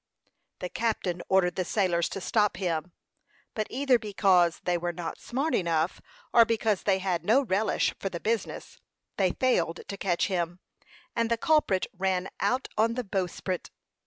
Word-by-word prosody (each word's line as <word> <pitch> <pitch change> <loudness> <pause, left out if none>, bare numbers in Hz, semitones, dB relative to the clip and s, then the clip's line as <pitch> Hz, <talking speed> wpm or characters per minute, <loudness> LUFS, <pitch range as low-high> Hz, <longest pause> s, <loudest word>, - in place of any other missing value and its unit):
The 180 - -3
captain 190 -6 -1
ordered 190 -2 +3
the 185 - +1
sailors 175 -2 +1
to 195 - -5
stop 210 -2 +1
him; 175 -2 -2 0.6
but 215 -1 -2
either 260 -1 +2
because 190 -5 +3
they 180 - +1
were 175 0 -1
not 170 -1 -6
smart 275 +6 -2
enough, 165 -1 0 0.3
or 235 - +8
because 225 -3 0
they 195 -2 +2
had 185 -3 -1
no 235 +9 +4
relish 215 -2 +1
for 195 - -2
the 170 - -5
business, 225 0 -3 0.4
they 185 -3 +2
failed 175 -10 +1
to 200 - -5
catch 180 -3 +1
him, 175 -2 -2 0.6
and 230 0 +1
the 230 - +2
culprit 275 -9 +2
ran 190 0 0
out 250 +7 0
on 230 +1 +3
the 250 - -2
bowsprit. 185 -2 -3
190 Hz, 160 wpm, -28 LUFS, 175-225 Hz, 0.6 s, or